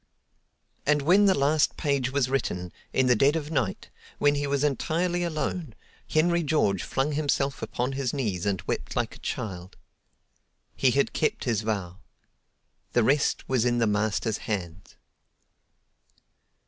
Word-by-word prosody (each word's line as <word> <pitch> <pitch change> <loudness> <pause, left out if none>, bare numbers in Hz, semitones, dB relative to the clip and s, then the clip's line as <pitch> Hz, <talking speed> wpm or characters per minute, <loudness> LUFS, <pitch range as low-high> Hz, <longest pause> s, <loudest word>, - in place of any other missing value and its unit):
And 150 -1 +2
when 190 +7 +5
the 190 -2 +4
last 145 +2 +2
page 140 -3 0
was 140 -2 +1
written, 90 -10 -2 0.2
in 130 - +2
the 125 -1 +4
dead 140 +7 +3
of 155 -1 -3
night, 125 -11 -2 0.3
when 145 0 +3
he 145 0 -1
was 140 0 0
entirely 170 +5 0
alone, 155 -4 -3 0.3
Henry 170 +2 +3
George 145 - +1
flung 135 +3 -1
himself 140 -4 0
upon 120 +4 -2
his 135 -2 -2
knees 105 -10 -2
and 95 -2 -1
wept - - -4
like - - -1
a - - -15
child. 95 -3 -5 1.0
He 130 - +3
had 140 +3 +1
kept 155 - 0
his 115 -5 0
vow. 100 -4 -3 0.9
The 120 - +4
rest 140 +5 +1
was 130 -4 +2
in 120 -1 +2
the 115 - +3
Master's 105 +1 0
hands. 90 -4 -4
135 Hz, 150 wpm, -27 LUFS, 110-150 Hz, 1.0 s, when